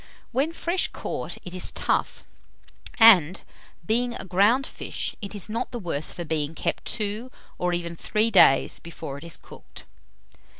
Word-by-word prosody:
When 275 +6 +1
fresh 340 +2 0
caught, - - -6
it 180 - -7
is 185 - 0
tough, - - -1 0.8
and, 190 -7 +7 0.4
being 240 +4 0
a - - -7
ground 205 +9 +3
fish, - - -5
it 200 0 -7
is 200 - -2
not 230 +3 -3
the 245 - -6
worse 165 -8 -4
for 175 - -6
being 155 0 -2
kept - - -2
two, 215 +2 -2 0.3
or 180 0 0
even 170 -1 -3
three 215 +6 +1
days 180 -9 +5
before 160 -4 -8
it - - -13
is 170 -1 -3
cooked. - - -13
195 Hz, 160 wpm, -25 LUFS, 170-230 Hz, 0.8 s, and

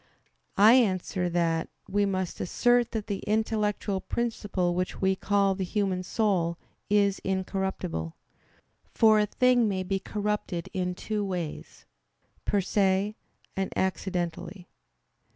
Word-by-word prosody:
I 215 +3 +8
answer 185 -6 +2
that, 165 -1 0 0.2
We 205 +1 +1
must 185 -2 -2
assert 240 +5 +2
that 220 -2 -4
the 200 -2 -3
intellectual 210 -2 0
principle 205 -6 -1
which 180 +1 -2
we 190 0 +2
call 200 0 +2
the 190 0 -3
human 190 -1 -1
soul 180 -4 0 0.3
is 200 -1 +3
incorruptible. 190 - -3 0.8
For 220 -1 +6
a 210 - +2
thing 250 +1 +3
may 190 -1 -1
be 195 +1 -1
corrupted 205 -4 -3
in 180 -1 -1
two 210 +2 -3
ways 180 -5 -5 0.6
per 205 - +2
se, 195 +2 +1 0.4
and 195 0 -2
accidentally. 180 0 -2
195 Hz, 120 wpm, -28 LUFS, 180-210 Hz, 0.8 s, I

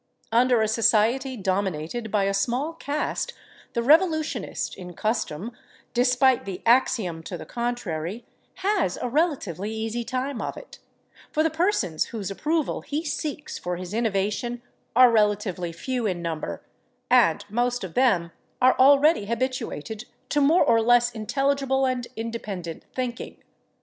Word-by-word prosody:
Under 240 0 +4
a - - +1
society 230 +4 +2
dominated 190 +2 -2
by 210 -1 +1
a 195 0 +1
small 245 +10 0
caste 300 -2 -3 0.4
the 235 - 0
revolutionist 315 +3 +2
in 180 -2 -9
custom, 215 -1 -2 0.4
despite 250 +1 +3
the 190 -2 -6
axiom 230 -8 +2
to 170 +2 -6
the - - -9
contrary, 230 -4 -3 0.4
has 395 - +1
a - - -3
relatively 235 - -1
easy 225 +2 -3
time 255 +2 -3
of - - -4
it, - - -12 0.5
for 310 - +2
the 320 - +1
persons 315 - +1
whose 205 -4 -5
approval 310 +8 -1
he 305 +3 -4
seeks 295 0 -4
for 180 0 -3
his 180 +2 -7
innovation 225 +2 -1 0.3
are 250 0 +8
relatively 210 -5 +1
few 240 +7 -2
in 180 -3 -2
number, 165 -2 -4 0.5
and 205 -6 +4
most 240 +3 0
of 180 -4 -6
them 195 -10 +2 0.3
are 255 +1 +5
already 280 -2 +5
habituated 230 - -3 0.2
to 290 - +2
more 315 +6 +5
or 230 -1 +4
less 240 +1 +4
intelligible 270 +4 0
and 255 -2 -1
independent 210 -7 -5
thinking. 250 -2 -4
235 Hz, 140 wpm, -25 LUFS, 195-265 Hz, 0.5 s, are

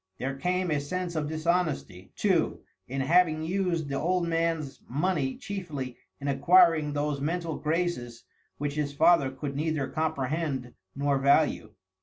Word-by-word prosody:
There 135 +1 -3
came 180 +4 -1
a 150 - +2
sense 175 +4 -3
of 150 -2 -1
dishonesty, 155 - -1
too, - - +1 0.3
in 135 +2 -2
having 155 +1 +3
used 175 -2 -1
the 140 -1 -2
old 180 +2 +1
man's 165 -4 -1
money 145 -1 0
chiefly 150 -11 -5 0.2
in 140 - -5
acquiring 155 +2 +4
those 145 -1 -1
mental 165 +1 -2
graces 150 -7 -2 0.3
which 145 0 -2
his 145 -1 -2
father 165 -3 +5
could 140 +1 -5
neither 155 -1 -1
comprehend 140 -4 -2 0.2
nor 140 0 +1
value. 140 -6 +2
155 Hz, 140 wpm, -28 LUFS, 140-170 Hz, 0.3 s, father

